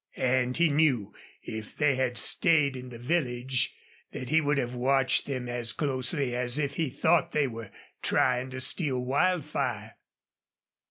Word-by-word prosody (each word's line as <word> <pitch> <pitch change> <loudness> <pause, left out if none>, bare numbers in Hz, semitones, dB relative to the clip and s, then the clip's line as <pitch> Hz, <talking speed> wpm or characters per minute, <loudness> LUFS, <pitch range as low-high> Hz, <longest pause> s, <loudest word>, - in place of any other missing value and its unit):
And 125 -1 +1
he 170 0 +4
knew 135 -9 +1 0.3
if 110 -1 -8
they 150 -2 +3
had 130 -2 -1
stayed 150 -6 +3
in 125 0 -8
the 120 - -9
village 125 -2 -1 0.4
that 130 - -7
he 160 +2 +3
would 145 -1 0
have 125 -2 -2
watched 130 +1 +2
them 130 -3 -4
as 120 -1 0
closely 130 -2 -1
as 125 +1 +3
if 145 -2 -1
he 160 -2 -1
thought 165 +5 +1
they 150 -2 +2
were 115 -4 -8 0.3
trying 125 0 +1
to 130 0 -5
steal 135 -1 +1
Wildfire. 135 - -1
130 Hz, 155 wpm, -28 LUFS, 125-145 Hz, 0.4 s, he